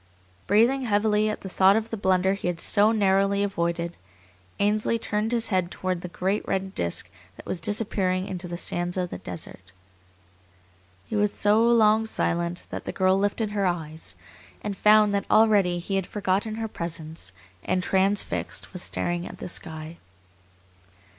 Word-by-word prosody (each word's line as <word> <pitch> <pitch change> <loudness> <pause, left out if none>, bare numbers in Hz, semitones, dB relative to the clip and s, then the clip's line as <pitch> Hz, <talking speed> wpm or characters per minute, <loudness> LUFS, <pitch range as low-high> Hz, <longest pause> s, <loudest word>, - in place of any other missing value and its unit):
Breathing 240 +6 +3
heavily 210 0 +2
at 215 - -4
the - - -7
thought 190 +1 +4
of 225 +1 -1
the - - -1
blunder 190 -2 +2
he 195 - -4
had 175 -1 -2
so 205 +5 +4
narrowly 200 -1 +2
avoided, 170 -3 -2 0.6
Ainsley 210 +3 +2
turned 220 0 -2
his 235 -2 +1
head 185 -4 +1
toward 185 -1 -3
the 180 - -5
great 190 +4 -1
red 190 0 -2
disk 85 - -1 0.3
that - - -11
was 175 - -3
disappearing 190 -2 0
into 180 -2 -5
the 175 0 -5
sands 175 +1 -2
of 180 -1 -2
the - - -6
desert. 90 +1 -7 1.3
He - - -5
was 210 -1 +2
so 210 +2 +3
long 220 -2 +4
silent 170 -4 -1
that - - -5
the - - -3
girl 185 0 +2
lifted 205 +2 0
her 200 -2 +1
eyes, 160 -3 -4 0.5
and 205 -1 -3
found 210 +1 +5
that 200 - -1
already 205 -5 +4
he 195 +3 -2
had 190 - -2
forgotten 205 +2 -1
her 225 0 -3
presence 165 - -5 0.3
and, 185 0 0
transfixed, 195 +1 0
was 180 - -4
staring 175 0 -2
at - - -10
the - - -6
sky. 160 -1 -5
195 Hz, 165 wpm, -25 LUFS, 175-210 Hz, 1.3 s, found